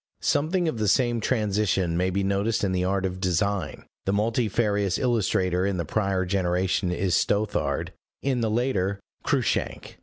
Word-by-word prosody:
Something 170 +4 +1
of 135 -8 -2
the 105 - +1
same 120 +2 +2
transition 105 -6 +1
may 90 +2 +1
be 100 +2 -1
noticed 100 +4 0
in 100 - +1
the 90 -1 0
art 95 +1 0
of 95 0 -3
design; 95 +2 -1 0.2
the 95 - +1
multifarious 105 -2 +1
illustrator 95 -7 +1
in 100 -1 0
the 85 - -2
prior 95 +1 0
generation 90 0 0
is 90 0 +1
Stothard, 105 +5 0 0.3
in 130 -3 0
the 110 - +1
later, 105 -4 0 0.2
Cruikshank. - - -1
100 Hz, 155 wpm, -25 LUFS, 95-110 Hz, 0.3 s, same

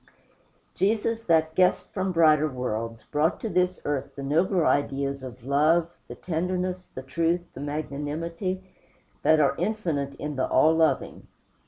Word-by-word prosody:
Jesus, 225 +3 0
that 160 -1 +3
guest 180 +2 +2
from 190 -1 -1
brighter 155 -3 +4
worlds, 115 -3 -4
brought 150 +2 0
to 225 - -2
this 180 -1 +1
earth 140 -2 -3
the 140 - -6
nobler 170 +5 +2
ideas 140 -1 0
of 125 -2 -9
love, 155 +5 +3 0.2
the - - -8
tenderness, 180 +2 -2
the 130 - -6
truth, 165 +6 0
the - - -9
magnanimity, 155 +6 -3 0.6
that 155 0 +4
are 140 -2 +4
infinite 160 -11 -2
in 150 0 -5
the 130 - +1
All 155 +5 +4
Loving. 155 -5 0
155 Hz, 145 wpm, -26 LUFS, 140-180 Hz, 0.6 s, brighter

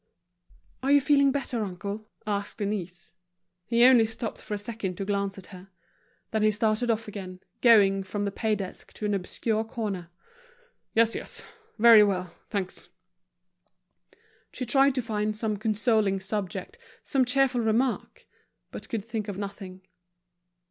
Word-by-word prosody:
"Are 270 +2 +1
you 285 - +7
feeling 280 0 +4
better, 260 -5 -2
uncle?" 200 +3 -6 0.2
asked 205 0 -2
Denise. 200 -5 -4 0.5
He 235 0 +4
only 245 -3 +7
stopped 225 0 -6
for 210 - -4
a - - -3
second 205 -3 -4
to 195 - -3
glance 200 -1 -1
at 190 - -10
her. 185 +1 -12 0.6
Then 220 - 0
he 215 - +5
started 215 +2 +1
off 225 -1 0
again, 185 -3 -8 0.2
going 200 -5 +6
from 205 +2 -3
the 200 - -1
pay 220 +1 0
desk 195 -2 -8
to 215 - -5
an 205 - 0
obscure 215 +3 -1
corner. 205 -6 -4 0.9
"Yes, 230 0 +4
yes. - - -6 0.3
Very 230 -1 +8
well, 185 -4 0 0.2
thanks." 195 -3 -4 1.6
She 255 - -4
tried 270 +2 +4
to 255 - -1
find 215 -1 -2
some 215 -1 -1
consoling 215 -1 +1
subject, 205 - -4 0.2
some 270 -2 +2
cheerful 250 0 +2
remark, 230 +3 -1 0.5
but - - -9
could 220 -4 -3
think 225 -2 -4
of 200 -2 -5
nothing. 195 -2 -7
215 Hz, 150 wpm, -27 LUFS, 200-230 Hz, 1.6 s, Very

